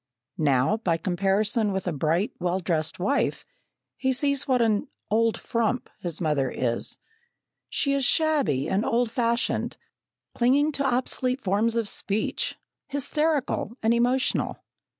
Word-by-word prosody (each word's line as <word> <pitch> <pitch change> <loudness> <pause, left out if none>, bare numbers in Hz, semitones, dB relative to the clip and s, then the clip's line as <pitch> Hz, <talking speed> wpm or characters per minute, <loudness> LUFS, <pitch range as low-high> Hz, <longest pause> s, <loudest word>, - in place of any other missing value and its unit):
Now, 140 +6 +3
by 180 -7 0
comparison 200 +5 +1
with 190 -1 -2
a 180 - -1
bright, 160 +7 0
well 180 +1 0
dressed 165 -3 -1
wife, 270 +11 0 0.5
he 265 - +1
sees 280 +1 +1
what 255 -2 +3
an 220 -3 +2 0.2
"old 225 +1 +2
frump" 235 0 -1
his 170 -3 -4
mother 150 -5 +1
is. 120 -2 -1 0.7
She 280 - +1
is 275 -1 +1
shabby 260 - +2
and 195 +3 +1
old 235 0 +1
fashioned, 235 0 0 0.6
clinging 275 +5 +3
to 280 -1 -2
obsolete 255 0 0
forms 215 +4 +1
of 230 -2 0
speech, 205 +1 -2 0.3
hysterical 285 -4 -1
and 225 +1 +4
emotional. 245 +3 +1
225 Hz, 130 wpm, -26 LUFS, 180-255 Hz, 0.7 s, and